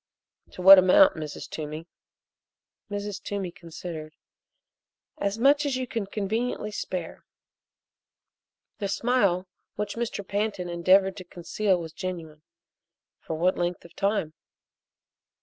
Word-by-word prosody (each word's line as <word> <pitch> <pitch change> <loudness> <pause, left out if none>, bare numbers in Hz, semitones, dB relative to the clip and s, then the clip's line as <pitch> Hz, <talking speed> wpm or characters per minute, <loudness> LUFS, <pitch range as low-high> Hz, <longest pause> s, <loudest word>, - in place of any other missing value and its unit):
"To 180 - -7
what 195 +1 +11
amount, 235 +11 +6
Mrs. 155 -2 -6
Toomey?" 155 +1 -6 1.0
Mrs. 205 -1 -4
Toomey 195 -3 -4
considered. 160 -2 -8 1.0
"As 200 +1 -1
much 280 +5 +4
as 280 -3 0
you 255 - -2
could 220 -5 -4
conveniently 215 +1 -2
spare." 180 -4 -5 1.6
The 200 - -1
smile 200 -4 +1 0.3
which 210 -1 -3
Mr. 230 -4 -4
Pantin 205 -3 -2
endeavored 185 +3 +3
to 185 - -7
conceal 180 +2 -1
was 165 -1 -7
genuine. 170 -5 -6 0.8
"For 160 - -5
what 180 +4 +1
length 175 0 -2
of 170 - -15
time?" 195 -6 0
190 Hz, 115 wpm, -26 LUFS, 170-210 Hz, 1.6 s, what